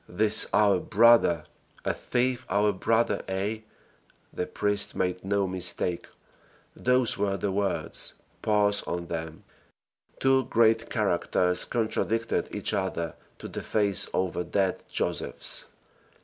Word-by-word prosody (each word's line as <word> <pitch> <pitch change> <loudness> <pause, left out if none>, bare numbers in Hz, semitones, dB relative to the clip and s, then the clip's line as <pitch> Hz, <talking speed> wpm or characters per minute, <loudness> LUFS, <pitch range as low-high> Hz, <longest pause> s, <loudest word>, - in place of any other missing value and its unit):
"THIS 105 +4 +6
OUR 100 -2 +4
BROTHER!" 110 -7 +4 0.4
a - - +1
thief 125 0 -1
our 105 +2 +2
brother? 110 +2 +1
ay! 105 +3 -3 0.7
the 90 - -3
priest 105 0 -1
made 90 0 -2
no 100 0 0
mistake, 90 -1 -1 0.7
those 125 -2 +2
were 100 -1 0
the 100 - -2
words; 100 -1 -2 0.3
pause 105 -1 +2
on 85 0 -3
them. 80 -1 -6 0.8
Two 135 0 +3
great 115 0 +2
characters 90 -4 0
contradicted 115 0 -1
each - - -2
other 85 -4 -2 0.2
to - - -8
the - - -6
face 100 -3 +1
over 90 -1 -1
dead 95 +2 -1
Josephs. - - -2
100 Hz, 120 wpm, -27 LUFS, 90-110 Hz, 0.8 s, THIS